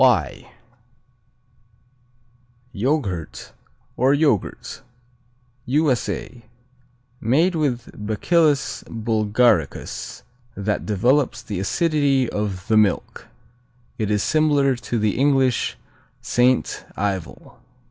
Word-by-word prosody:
Y - - +2 2.2
Yoghurt, 100 - -2 0.4
or 130 +3 +3
Yogurt 145 - -1 0.9
U.S.A. 130 -3 -1 0.8
Made 155 +11 +2
with 140 -7 -2
Bacillus 140 - +1
bulgaricus, 110 - 0 0.3
that 100 +1 -2
develops 125 +7 +1
the 100 -4 -4
acidity 140 - +1
of 100 -4 -4
the 110 - +3
milk. 105 -3 0 0.7
It 105 -2 -1
is 105 -1 +1
similar 145 -4 +2
to 120 0 -4
the 105 -2 +1
English 135 -3 +2 0.4
Saint 125 +1 +1
Ivel. 95 -3 -4
120 Hz, 80 wpm, -22 LUFS, 105-140 Hz, 2.2 s, or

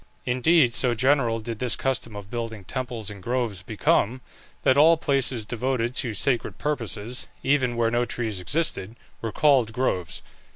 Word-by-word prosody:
Indeed 130 +1 +3
so 120 0 +3
general 125 -2 +2
did 110 0 -6
this 125 -3 +1
custom 130 -5 -2
of 100 -1 -9
building 115 -4 -4
temples 120 -2 -4
in 100 -2 -10
groves 120 -3 -2
become, 110 +4 +1 0.4
that 130 - +4
all 160 +3 +6
places 135 -7 0
devoted 120 +1 -1
to 120 -4 -2
sacred 125 +3 0
purposes, 125 -4 -3 0.2
even 130 -3 +2
where 115 -1 +1
no 120 +1 +2
trees 115 -4 -3
existed, 115 - -1 0.3
were 115 - -3
called 135 -6 +3
groves. 95 -9 -2
120 Hz, 155 wpm, -25 LUFS, 110-130 Hz, 0.4 s, all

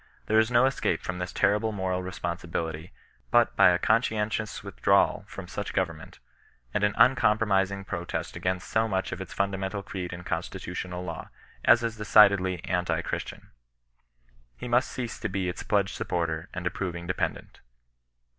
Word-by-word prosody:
There 110 +1 +4
is 110 +1 +3
no 125 +1 +5
escape 130 -10 0
from 90 0 -4
this 90 0 -3
terrible 110 +2 +2
moral 95 -3 -2
responsibility 85 -2 -4 0.4
but - - +3
by - - +7
a 90 - +3
conscientious 110 +1 0
withdrawal - - +2
from - - -8
such - - -5
government, - - -3 0.6
and 105 - 0
an 105 0 +2
uncompromising 100 -5 +3
protest 85 -1 -4
against 90 0 -2
so 110 0 +1
much 95 -3 -1
of - - -5
its - - -7
fundamental 100 0 -2
creed 90 -3 -5
and 90 0 -8
constitutional 90 +1 -4
law, 85 -3 -6 0.4
as 120 - +6
is 115 -1 -2
decidedly 100 -4 +5
anti 90 -1 0
Christian, - - -5 1.1
He - - -6
must 120 +2 +2
cease 120 -3 -5
to - - -3
be 95 -1 -2
its 90 - -4
pledged 100 -2 +1
sup - - -4
porter 85 0 -2
and 95 -1 -6
approving 90 -1 -3
dependent. 95 - -3
95 Hz, 155 wpm, -27 LUFS, 90-105 Hz, 1.1 s, by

